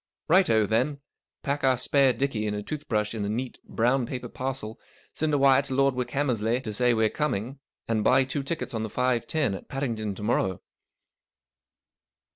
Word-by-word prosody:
" - - -66
Right 185 +3 +5
o, 110 -1 +4
then. 125 +7 0 0.4
Pack 140 +1 -2
our 130 -1 +4
spare 135 +1 +3
dickey 125 -5 -1
and 105 - -2
a 105 - -4
toothbrush 110 -7 -2
in 110 -2 -3
a 100 - -2
neat 125 +4 -4
brown 120 +2 +1
paper 125 -1 -5
parcel, 130 -4 -4 0.3
send 155 0 -1
a 145 - +3
wire 135 -1 +5
to 135 -2 -4
Lord 135 0 +3
Wickhammersley 125 -3 0
to 110 - -4
say 125 +2 +3
we're 110 0 +3
coming, 130 -1 -2 0.3
and 110 -2 0
buy 130 +4 +5
two 135 +2 -3
tickets 160 +2 -4
on 110 - -2
the 110 - -3
five 125 +1 0
ten 150 -10 0
at 95 - -8
Paddington 115 -7 -3
to 105 - -8
morrow." 95 -4 0
125 Hz, 190 wpm, -26 LUFS, 110-135 Hz, 0.4 s, Right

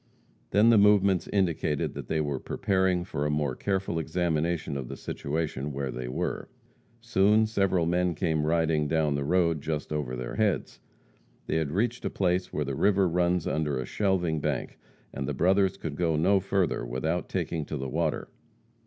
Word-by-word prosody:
Then 110 +3 +5
the 110 - +6
movements 100 -3 +4
indicated 85 -6 0
that - - -7
they 80 - 0
were 70 -3 -1
preparing 95 -2 0
for 75 -5 -3
a 75 - 0
more 75 -3 0
careful 95 -2 -1
examination 80 -1 -1
of 65 -3 -4
the - - -7
situation 75 -1 -3
where 70 -1 -3
they - - -5
were. 60 - -3 0.5
Soon 110 -1 +3
several 95 -5 +1
men 90 0 +1
came 80 -3 0
riding 80 -2 +2
down 80 -1 +1
the 70 0 -1
road 85 -1 +2
just 75 0 -3
over 70 -5 -2
their 60 -1 -5
heads. 105 -3 0 0.7
They - - 0
had 80 -3 0
reached 115 +9 -1
a - - -1
place 90 -1 0
where 75 - -2
the 70 - -3
river 95 +6 +3
runs 90 0 +1
under 75 -3 -1
a 65 - -3
shelving 90 -6 0
bank 75 -4 -3 0.3
and 65 - -4
the - - -2
brothers 95 +1 +2
could 80 -6 -5
go 80 -1 +1
no 95 +6 +3
further 95 -6 0
without 65 +9 -2
taking 85 -3 -2
to 75 - -4
the 65 0 -4
water. 80 +2 -1
80 Hz, 180 wpm, -28 LUFS, 75-95 Hz, 0.7 s, the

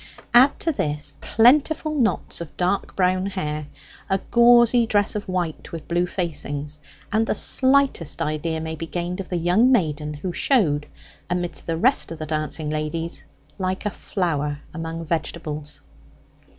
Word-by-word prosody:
Add 260 +4 +6
to 330 - +2
this, 150 - -2
plentiful 300 +6 +3
knots 230 - 0
of 170 - -9
dark 185 +2 -1
brown 185 0 +1
hair, 150 -6 -4 0.4
a 195 - +3
gauzy 235 0 +6
dress 205 -2 +2
of 210 -1 -4
white, 175 -4 -3
with 165 -2 -7
blue 175 +1 +1
facings; 150 -5 -4 0.3
and 220 +2 +2
the - - 0
slightest 265 - +2
idea 160 0 -2
may 160 0 -4
be 160 +1 -6
gained 175 +2 -4
of 195 - -6
the 180 - -1
young 180 +9 +3
maiden 150 - 0
who 175 +4 -5
showed, 160 - +2 0.4
amidst 175 -1 -3
the 165 -1 -1
rest 255 0 +3
of 165 - -6
the 155 - -5
dancing 155 0 -2
ladies, 155 +2 -3 0.3
like 185 +1 -2
a 210 - 0
flower 150 -8 -2
among 165 0 -5
vegetables. 155 -2 -4
175 Hz, 150 wpm, -23 LUFS, 155-210 Hz, 0.4 s, Add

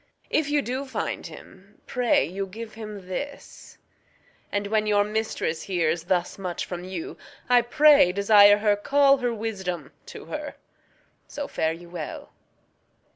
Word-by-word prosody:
If 305 -2 +1
you 290 -1 +1
do 260 +3 -3
find 260 - -4
him, 195 +2 -15
pray 250 -2 +2
you 195 +3 -4
give 220 +3 -9
him 210 -4 -9
this; 280 +10 -7 0.7
And 205 0 -1
when 215 +1 0
your 205 -1 +3
mistress 210 -6 -2
hears 170 -3 -1
thus 180 +1 -1
much 180 -3 -4
from 175 -1 -6
you, 180 -3 -6 0.3
I 245 -1 +5
pray 290 - +5
desire 205 +1 +6
her 210 -1 +2
call 275 +6 +4
her 245 -2 -1
wisdom 190 - -4 0.2
to - - -10
her. - - -6 0.7
So - - -5
farewell. 165 0 -4
205 Hz, 135 wpm, -25 LUFS, 180-235 Hz, 0.7 s, desire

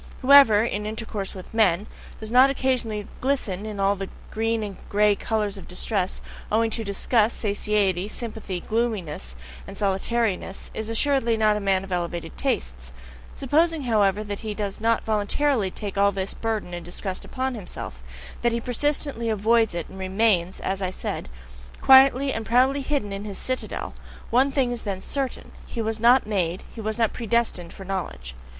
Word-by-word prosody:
Whoever, 255 -6 +8
in 210 -2 -2
intercourse 215 -3 -4
with 185 +2 -10
men, 205 -4 +3 0.3
does 220 0 -7
not 255 +3 +7
occasionally 245 -6 -1
glisten 220 -7 -1
in 210 -2 -6
all 195 +1 +3
the 195 -1 -5 0.2
green 225 0 0
and 200 -3 -6
grey 210 0 +4
colours 210 -2 -2
of - - -12
distress, 185 +1 -1 0.3
owing 225 +1 +2
to 225 - -1
disgust, 215 +2 +1
satiety, 200 -3 0
sympathy, 215 -5 -5
gloominess, 205 - -2 0.3
and 195 - -9
solitariness, 200 0 -1
is 220 0 -3
assuredly 235 -1 +2
not 215 -1 +3
a - - -1
man 195 -2 +1
of 195 - -10
elevated 170 -2 -3
tastes; 60 0 -2 0.4
supposing, 315 +3 +2
however, 210 -4 +2
that 205 -1 -5
he 215 -2 -5
does 205 -1 -3
not 230 0 +2
voluntarily 220 +2 +1
take 200 +1 -4
all 200 0 +5
this 195 0 -3
burden 220 -5 -3
and 175 -1 -5
disgust 185 +2 -5
upon 260 0 -3
himself, 180 - -7 0.4
that 240 - +2
he 235 - 0
persistently 250 0 -1
avoids 220 -1 +2
it, 170 -2 -3
and 190 - -11
remains, 190 -2 +1
as 195 +1 -2
I 185 - 0
said, 185 - -4 0.5
quietly 270 0 +6
and 225 - -3
proudly 255 +5 +3
hidden 265 -8 -2
in 195 +1 -5
his 200 -2 -5
citadel, 255 0 -2 0.4
one 260 +4 +4
thing 265 -3 +1
is 240 - -4
then 195 -3 -3
certain: 270 +6 -4 0.2
he 235 - -6
was 220 0 -1
not 245 +3 +5
made, 185 -4 -1
he 225 - -7
was 220 +1 -2
not 225 -2 +1
predestined 230 -7 -1
for 195 - -10
knowledge. 180 - -4
215 Hz, 170 wpm, -24 LUFS, 195-235 Hz, 0.5 s, Whoever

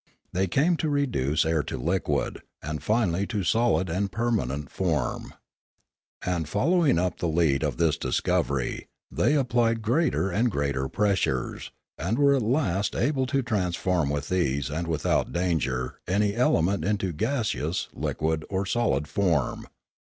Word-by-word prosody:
They 95 +2 +1
came 155 - +2
to 155 - -1
reduce 120 - +1
air 80 -1 +2
to - - -5
liquid, 85 +9 -1 0.2
and 75 0 -4
finally 100 0 +1
to 105 -4 -2
solid 110 0 +2
and 95 +4 -1
permanent, 85 - -1
form. 80 -9 -2 0.9
And, 85 -4 -1
following 155 - +3
up 90 0 -1
the 85 - 0
lead 80 -4 +2
of - - -1
this 80 -2 +2
discovery, 70 -3 -1 0.2
they 150 - +2
applied 120 -4 +1
greater 120 - +1
and 115 +7 +2
greater 70 -6 -1
pres 100 -2 +1
sures, - - -2 0.3
and 95 +9 -1
were 140 0 +5
at 135 - +1
last 110 - 0
able 135 -3 +1
to 135 +2 0
transform 90 - 0
with 70 +1 -3
ease 70 -7 0
and 85 +3 -3
without 80 -2 0
danger 75 -8 -1
any 100 +2 +1
element 100 -5 +2
into 95 -3 -1
gaseous, 110 - -1
liquid, 80 0 -1
or 95 0 -1
solid 95 - 0
form. 80 -4 0
95 Hz, 145 wpm, -26 LUFS, 80-115 Hz, 0.9 s, were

